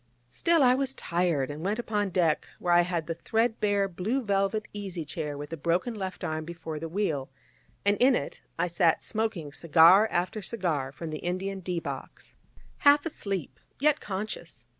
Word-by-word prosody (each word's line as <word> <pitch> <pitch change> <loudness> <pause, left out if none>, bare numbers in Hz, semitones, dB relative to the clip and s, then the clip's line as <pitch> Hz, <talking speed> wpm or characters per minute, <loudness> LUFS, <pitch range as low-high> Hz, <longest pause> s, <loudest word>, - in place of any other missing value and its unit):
Still 335 -3 +3
I 250 -1 +6
was 270 0 -1
tired, 170 -6 0
and 150 +2 -7
went 205 +3 0
upon 210 -4 -1
deck, 170 -4 +1
where 175 - +1
I 175 - +7
had 170 -2 -1
the 165 - -2
threadbare 210 0 +1
blue 205 +9 -2
velvet 200 +1 0
easy 190 -5 -5
chair 150 -2 -4
with 145 +2 -7
the 165 - -4
broken 170 - 0
left 190 -4 -5
arm 155 -2 -2
before 160 -2 -6
the 165 +1 -5
wheel, 160 -8 -1 0.6
and 205 0 +3
in 255 +1 +5
it - - -4 0.3
sat 170 -1 +2
smoking 215 -10 -2
cigar 170 +7 +6
after 185 +5 -1
cigar 170 - -2
from 155 +4 -7
the 155 - -4
Indian 190 +2 -3
D 180 -1 -2
box, - - -8 0.4
half 285 +1 +5
asleep, 190 - -4 0.2
yet 300 +2 +3
conscious. 205 -1 -6
185 Hz, 170 wpm, -28 LUFS, 165-215 Hz, 0.6 s, I